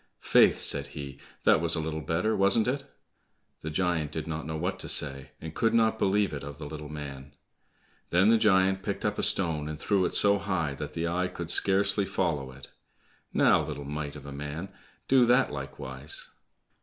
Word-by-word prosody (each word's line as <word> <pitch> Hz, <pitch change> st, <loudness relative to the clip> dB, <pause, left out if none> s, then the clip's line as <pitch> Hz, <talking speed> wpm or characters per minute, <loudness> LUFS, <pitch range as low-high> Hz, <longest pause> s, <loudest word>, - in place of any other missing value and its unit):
"Faith," -, -, +5 dB
said -, -, 0 dB
he, 70 Hz, -1 st, -7 dB, 0.2 s
"that -, -, +4 dB
was 85 Hz, -1 st, +4 dB
a -, -, -1 dB
little 80 Hz, 0 st, -3 dB
better, 90 Hz, +8 st, 0 dB
wasn't 100 Hz, +4 st, +4 dB
it?" 140 Hz, +2 st, -2 dB, 0.7 s
The 80 Hz, -, -6 dB
giant 80 Hz, -2 st, -1 dB
did 80 Hz, 0 st, -4 dB
not 80 Hz, 0 st, -5 dB
know 80 Hz, 0 st, -3 dB
what 90 Hz, +4 st, -3 dB
to -, -, -6 dB
say, 70 Hz, -2 st, +1 dB
and 80 Hz, 0 st, -8 dB
could 115 Hz, +5 st, +1 dB
not 110 Hz, -1 st, +2 dB
believe 100 Hz, -1 st, +1 dB
it 70 Hz, -, -5 dB
of 70 Hz, 0 st, -8 dB
the 75 Hz, -, -8 dB
little 75 Hz, 0 st, -8 dB
man. 70 Hz, -2 st, -8 dB, 0.7 s
Then 95 Hz, +5 st, +4 dB
the 115 Hz, -, +4 dB
giant 95 Hz, -2 st, +3 dB
picked -, -, -4 dB
up -, -, -1 dB
a -, -, +1 dB
stone 80 Hz, -5 st, +1 dB
and 75 Hz, 0 st, -6 dB
threw 100 Hz, -3 st, +1 dB
it -, -, -2 dB
so 100 Hz, 0 st, +4 dB
high 85 Hz, -8 st, -1 dB
that -, -, -7 dB
the 85 Hz, +1 st, -2 dB
eye 90 Hz, +2 st, 0 dB
could 85 Hz, -2 st, -5 dB
scarcely 100 Hz, +2 st, +3 dB
follow 75 Hz, -9 st, -2 dB
it. 65 Hz, 0 st, -13 dB, 0.6 s
"Now, -, -, +4 dB
little 70 Hz, -1 st, -6 dB
mite 75 Hz, 0 st, -5 dB
of 70 Hz, -1 st, -10 dB
a 70 Hz, -, -8 dB
man, 75 Hz, +6 st, -6 dB, 0.4 s
do 130 Hz, -1 st, +5 dB
that 125 Hz, +2 st, +3 dB
likewise." 70 Hz, 0 st, -6 dB
80 Hz, 195 wpm, -28 LUFS, 75-95 Hz, 0.7 s, Faith